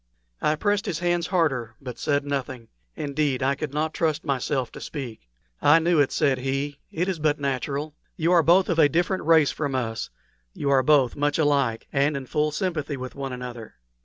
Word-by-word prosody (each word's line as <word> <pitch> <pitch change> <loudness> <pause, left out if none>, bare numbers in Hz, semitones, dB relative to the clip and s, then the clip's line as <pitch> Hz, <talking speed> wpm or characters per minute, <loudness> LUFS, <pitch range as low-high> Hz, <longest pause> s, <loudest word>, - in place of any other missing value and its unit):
I 150 - +2
pressed 205 +4 0
his 160 - -1
hands 175 0 0
harder, 135 - 0
but 125 -3 -8
said 145 -1 0
nothing. 130 -4 -4 0.3
Indeed, 140 -2 -1
I 135 +1 +3
could 145 0 -4
not 155 +2 -1
trust 155 -3 -1
myself 135 -2 -1
to - - -10
speak. 120 - -7 0.3
"I 145 +3 +6
knew 165 0 +2
it," 145 - +3
said 140 -4 +1
he; 135 +2 -2
"it 175 +3 -2
is 185 -4 -2
but 150 -1 +1
natural. 140 +2 -2 0.2
You 165 +2 +1
are 175 -2 +6
both 175 +4 +4
of 170 -2 0
a 145 - +6
different 175 +5 0
race 160 -3 +5
from 145 -3 -3
us; 115 -3 -2 0.5
you 140 - -1
are 135 -1 +5
both 135 -4 +3
much 145 0 0
alike, 140 -7 +1
and 140 +1 +2
in 135 - -6
full 150 +4 0
sympathy 150 -3 -2
with 130 0 -6
one 135 -1 -5
another. 125 -3 -7
145 Hz, 195 wpm, -25 LUFS, 130-160 Hz, 0.5 s, I